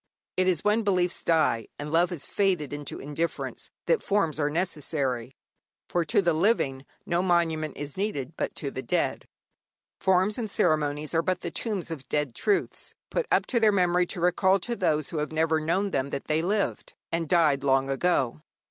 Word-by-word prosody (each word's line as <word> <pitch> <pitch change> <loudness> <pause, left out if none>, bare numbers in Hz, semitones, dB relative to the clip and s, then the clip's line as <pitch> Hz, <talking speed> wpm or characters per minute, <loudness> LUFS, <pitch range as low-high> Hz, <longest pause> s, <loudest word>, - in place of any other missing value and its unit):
It 185 0 +2
is 180 -4 +1
when 210 +2 +3
beliefs 180 -4 0
die, 155 -9 +2
and 150 +1 -6
love 170 +2 +3
has 175 -6 -2
faded 180 -8 0
into 145 -1 -6
indifference, 150 +4 -4 0.2
that 485 - +2
forms 165 -7 0
are 145 -1 +2
necessary, 145 -7 -2 0.5
for 175 - 0
to 160 - +2
the 170 -2 +3
living 155 - +1 0.2
no 170 0 +1
monument 165 -4 +1
is 145 0 -6
needed, 165 -9 -2
but - - -3
to 140 - -4
the 130 - -4
dead. 120 - -1 0.7
Forms 190 +4 +2
and 220 -3 -3
ceremonies 155 -4 +1
are 165 - +3
but 185 +2 -1
the - - -4
tombs 205 -7 -3
of 135 -5 -7
dead 150 -4 -1
truths, 405 - -1 0.2
put - - -1
up - - +3
to 240 - +1
their 220 -2 +5
memory 180 -2 +2
to 175 - -4
recall 185 +2 +3
to 235 +5 -2
those 155 -8 0
who 160 - -2
have 150 +1 -2
never 160 0 +2
known 180 +6 0
them 135 -3 -1
that 140 - -4
they 155 +1 +1
lived 200 +4 -1 0.2
and 165 -2 -1
died 155 -6 +3
long 135 -1 +3
ago. 135 -3 +1
165 Hz, 185 wpm, -27 LUFS, 145-185 Hz, 0.7 s, their